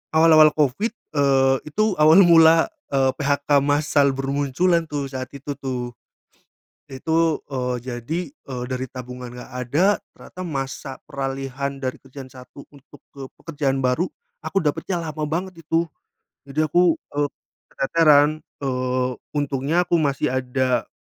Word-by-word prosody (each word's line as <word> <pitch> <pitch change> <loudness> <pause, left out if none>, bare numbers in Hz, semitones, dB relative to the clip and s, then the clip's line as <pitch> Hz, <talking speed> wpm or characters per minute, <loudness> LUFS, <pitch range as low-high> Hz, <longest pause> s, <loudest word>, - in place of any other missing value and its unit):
awal-awal 160 -1 +7
covid, 150 - +1 0.2
eee, 135 -2 +4
itu 215 +4 +1
awal 155 +4 +7
mula, 165 -1 +6 0.2
eee, 135 -1 +3
PHK 145 0 +2
massal 145 -1 +2
bermunculan, 140 +6 0
tuh, 145 -2 -3
saat 130 -1 -6
itu, 140 +1 -6
tuh. 125 -2 -4 0.9
Itu, 160 +4 0
eee, 125 -2 -2
jadi, 125 +6 -4
eee, 130 -4 -8
dari 130 0 -3
tabungan 125 -1 -8
nggak 125 +1 -10
ada 180 +11 +2 0.2
ternyata 185 - -12
masa 135 -3 -4 0.2
peralihan 135 -1 -4
dari 130 -1 -3
kerjaan 135 -1 -11
satu 130 +2 -13
untuk 145 -1 -18
ke 135 -1 -7
pekerjaan 140 -4 -2
baru 130 +8 +1 0.4
aku 195 -3 0
dapatnya 170 +4 -1
lama 155 -1 -4
banget 175 +3 -4
itu. 165 +1 0 0.6
Jadi 150 +3 0
aku, 170 +2 +3 0.2
eee, 145 0 0 0.4
keteteran, 150 0 +3 0.2
eee, 130 -1 -1 0.3
untungnya 145 +4 0
aku 170 -1 +1
masih 140 -1 0
ada, 130 -2 0
140 Hz, 130 wpm, -22 LUFS, 130-155 Hz, 0.9 s, awal-awal